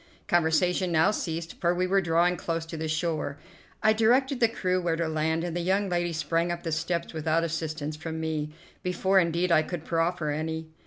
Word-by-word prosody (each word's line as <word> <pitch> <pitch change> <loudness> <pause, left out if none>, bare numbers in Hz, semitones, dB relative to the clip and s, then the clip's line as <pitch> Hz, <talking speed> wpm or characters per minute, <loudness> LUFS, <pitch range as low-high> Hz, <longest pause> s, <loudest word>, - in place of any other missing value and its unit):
Conversation 175 0 +2
now 160 +5 +4
ceased, 165 -4 -4
for 175 0 +2
we 180 +1 +1
were 195 +1 +3
drawing 175 +1 +2
close 165 -1 -3
to 165 - -7
the 160 0 -3
shore. 155 -2 -1 0.5
I 215 0 +5
directed 250 +4 +3
the 230 - +5
crew 185 -5 -1
where 170 -2 0
to 165 0 -1
land, 160 +1 0
and 175 -1 -3
the 175 - -1
young 195 +3 +1
lady 175 -1 0
sprang 165 +1 0
up 175 0 -4
the 165 - -3
steps 170 +2 -2
without 160 +1 +1
assistance 155 -2 -3
from 160 +1 -5
me, 155 -2 -2 0.3
before, 190 +1 +2
indeed, 170 +1 +1
I 155 - +6
could 160 0 -5
proffer 165 -2 0
any. 160 +1 -3
170 Hz, 200 wpm, -27 LUFS, 160-180 Hz, 0.5 s, I